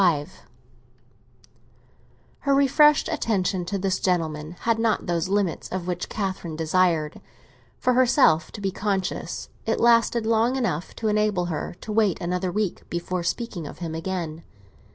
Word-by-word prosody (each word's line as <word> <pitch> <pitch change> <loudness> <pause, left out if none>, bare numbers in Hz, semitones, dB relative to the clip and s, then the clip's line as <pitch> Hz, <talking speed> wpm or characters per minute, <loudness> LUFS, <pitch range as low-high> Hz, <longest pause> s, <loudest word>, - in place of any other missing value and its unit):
XXXV 155 -6 +2 2.1
HER 280 -1 +2
refreshed 285 +2 +5
attention 195 - 0
to 200 +3 -2
this 190 -1 0
gentleman 160 -3 -1
had 230 -1 +1
not 225 -1 +1
those 170 0 -1
limits 200 -3 0
of 185 -2 -4
which 175 -1 -3
Catherine 190 -5 -3
desired, 160 -1 +1 0.6
for 255 - +2
herself, 245 - +4
to 210 - -7
be 195 -1 -1
conscious; 195 -1 -2 0.2
it - - +1
lasted 235 -1 +4
long 230 +3 +2
enough 180 - -2
to 225 - -2
enable 210 -4 +1
her 155 +3 -4
to 215 - -6
wait 210 -4 +2
another 180 +1 -1
week 210 -1 -2
before 175 +1 -2
speaking 175 -2 -3
of - - -9
him 165 -2 -5
again. 165 -1 -4
190 Hz, 145 wpm, -24 LUFS, 170-225 Hz, 2.1 s, refreshed